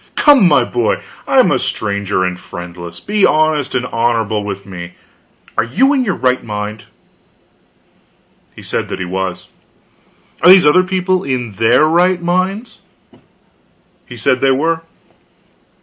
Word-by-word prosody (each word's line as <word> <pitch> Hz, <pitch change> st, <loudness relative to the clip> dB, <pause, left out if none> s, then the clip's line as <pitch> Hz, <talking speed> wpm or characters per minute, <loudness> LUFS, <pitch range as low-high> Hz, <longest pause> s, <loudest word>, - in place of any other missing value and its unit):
Come, 280 Hz, -, +5 dB
my 145 Hz, -6 st, +4 dB
boy, 120 Hz, -2 st, -1 dB, 0.3 s
I -, -, +1 dB
am -, -, +5 dB
a -, -, +1 dB
stranger 100 Hz, -2 st, -2 dB
and 90 Hz, -1 st, -3 dB
friendless; 85 Hz, -1 st, -9 dB
be 210 Hz, 0 st, -1 dB
honest 155 Hz, -2 st, +2 dB
and 125 Hz, -, -1 dB
honorable 115 Hz, -3 st, -1 dB
with 100 Hz, -1 st, -6 dB
me. 90 Hz, -2 st, -9 dB, 0.6 s
Are -, -, +1 dB
you 260 Hz, -, +2 dB
in 265 Hz, -3 st, +1 dB
your 195 Hz, -7 st, -1 dB
right 130 Hz, 0 st, 0 dB
mind?" 105 Hz, 0 st, -6 dB, 1.7 s
He -, -, -12 dB
said -, -, -3 dB
he 95 Hz, -, -4 dB
was. 95 Hz, 0 st, -4 dB, 0.9 s
"Are -, -, +6 dB
these 185 Hz, -2 st, +8 dB
other 150 Hz, +5 st, +5 dB
people 185 Hz, 0 st, -1 dB
in 125 Hz, -4 st, -3 dB
their 115 Hz, +8 st, +3 dB
right 175 Hz, +3 st, +2 dB
minds?" 190 Hz, +6 st, -2 dB, 1.3 s
He 120 Hz, -, -10 dB
said 125 Hz, +3 st, 0 dB
they 135 Hz, -, +3 dB
were. 160 Hz, +5 st, 0 dB
125 Hz, 140 wpm, -15 LUFS, -, 1.7 s, these